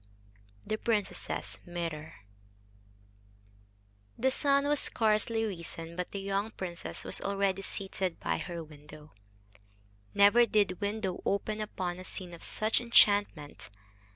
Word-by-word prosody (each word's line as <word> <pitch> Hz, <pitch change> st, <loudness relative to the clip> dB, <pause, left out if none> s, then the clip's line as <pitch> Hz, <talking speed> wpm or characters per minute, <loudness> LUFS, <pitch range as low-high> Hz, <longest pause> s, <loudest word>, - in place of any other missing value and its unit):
THE 215 Hz, -, -2 dB
PRINCESS'S 215 Hz, -4 st, -2 dB
MIRROR 165 Hz, -3 st, -4 dB, 2.0 s
The 265 Hz, +2 st, +2 dB
sun 280 Hz, +1 st, +3 dB
was 295 Hz, -1 st, +3 dB
scarcely 225 Hz, 0 st, +1 dB
risen, 170 Hz, -4 st, -5 dB
but 180 Hz, 0 st, -3 dB
the 200 Hz, -, -5 dB
young 200 Hz, +2 st, -1 dB
princess 185 Hz, -5 st, -5 dB
was -, -, -3 dB
already 195 Hz, -1 st, 0 dB
seated 190 Hz, -2 st, -2 dB
by -, -, -1 dB
her 170 Hz, -2 st, -5 dB
window. 150 Hz, 0 st, -13 dB, 1.0 s
Never 215 Hz, +4 st, +7 dB
did 205 Hz, -3 st, +2 dB
window 205 Hz, -2 st, -2 dB
open 210 Hz, +2 st, -1 dB
upon 180 Hz, -4 st, -3 dB
a -, -, -7 dB
scene 185 Hz, -1 st, -5 dB
of 170 Hz, -, -10 dB
such 215 Hz, +3 st, +1 dB
enchantment. 205 Hz, -10 st, +3 dB
195 Hz, 120 wpm, -31 LUFS, 175-215 Hz, 2.0 s, Never